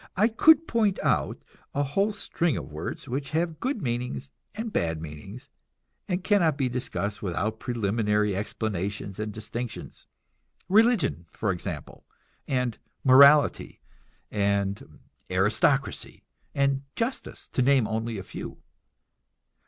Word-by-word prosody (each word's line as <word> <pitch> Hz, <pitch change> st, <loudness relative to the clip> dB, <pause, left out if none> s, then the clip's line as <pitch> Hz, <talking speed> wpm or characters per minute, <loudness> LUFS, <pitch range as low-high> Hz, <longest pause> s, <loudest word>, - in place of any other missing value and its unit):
I 215 Hz, +4 st, +4 dB
could 320 Hz, +8 st, +5 dB
point 215 Hz, -4 st, +2 dB
out -, -, 0 dB, 0.3 s
a 145 Hz, -, +2 dB
whole 195 Hz, +10 st, +1 dB
string 175 Hz, -, -1 dB
of 65 Hz, -, -7 dB
words 75 Hz, -, -6 dB
which 135 Hz, +2 st, -3 dB
have 165 Hz, -2 st, -1 dB
good 255 Hz, -, -2 dB
meanings 120 Hz, -, -3 dB, 0.2 s
and 220 Hz, 0 st, -4 dB
bad 80 Hz, -2 st, 0 dB
meanings, 90 Hz, -, -9 dB, 0.6 s
and 180 Hz, -2 st, -1 dB
cannot 185 Hz, -7 st, +3 dB
be 135 Hz, -3 st, +1 dB
discussed 105 Hz, -5 st, -3 dB
without 105 Hz, +4 st, -2 dB
preliminary 105 Hz, -3 st, 0 dB
explanations 100 Hz, -1 st, -3 dB
and 105 Hz, 0 st, -3 dB
distinctions; 110 Hz, +2 st, -7 dB, 0.6 s
religion, 195 Hz, -, +3 dB
for 105 Hz, -, -1 dB
example, 90 Hz, -4 st, -6 dB, 0.4 s
and 125 Hz, -4 st, -1 dB, 0.2 s
morality, 140 Hz, +3 st, +6 dB, 0.5 s
and 100 Hz, -1 st, -1 dB, 0.3 s
aristocracy, -, -, +1 dB, 0.3 s
and 140 Hz, -1 st, +2 dB
justice, 235 Hz, +3 st, -4 dB
to -, -, 0 dB
name 130 Hz, -2 st, +4 dB
only 110 Hz, 0 st, -2 dB
a 95 Hz, -, -5 dB
few. -, -, -8 dB
120 Hz, 120 wpm, -27 LUFS, 100-160 Hz, 0.6 s, morality